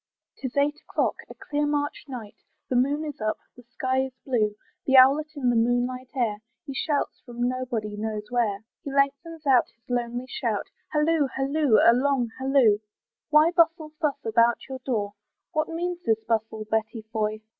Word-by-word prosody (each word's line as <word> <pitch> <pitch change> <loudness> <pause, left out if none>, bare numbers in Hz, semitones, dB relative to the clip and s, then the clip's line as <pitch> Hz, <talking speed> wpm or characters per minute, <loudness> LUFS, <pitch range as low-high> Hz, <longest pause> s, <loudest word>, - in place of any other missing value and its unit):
Tis 260 0 -6
eight 295 +1 +2
o'clock, - - -1
a - - -10
clear 295 0 -2
March 290 0 -2
night, 240 -6 -8 0.3
The 255 - 0
moon 285 +5 +2
is 295 -4 -7
up 215 0 0 0.2
the 245 - -13
sky 260 +2 -1
is 265 - -9
blue, 215 -6 +1 0.3
The 265 0 +6
owlet 275 +4 +7
in 255 -4 +1
the - - +1
moonlight 245 +2 +1
air, 230 -5 0 0.3
He 275 - -6
shouts 290 +2 -1
from 240 0 -2
nobody 245 -5 -3
knows 210 0 -4
where; 220 -4 0 0.2
He 280 - -5
lengthens 280 +4 0
out 260 -3 +4
his 230 - -47
lonely 245 0 -2
shout, - - -2 0.2
Halloo! 300 -1 +2
halloo! 275 -2 +2
a 230 - +8
long 255 -2 +1
halloo! 260 -6 +4 0.5
Why 310 +2 +6
bustle 330 -2 +2
thus 300 -3 +1
about 230 +1 +3
your 265 -1 -6
door, 215 -6 -2 0.4
What 310 0 0
means 345 +1 -3
this 225 -6 +1
bustle, 220 -1 -1
Betty 220 +1 -2
Foy? 215 -1 -1
255 Hz, 170 wpm, -26 LUFS, 225-285 Hz, 0.5 s, a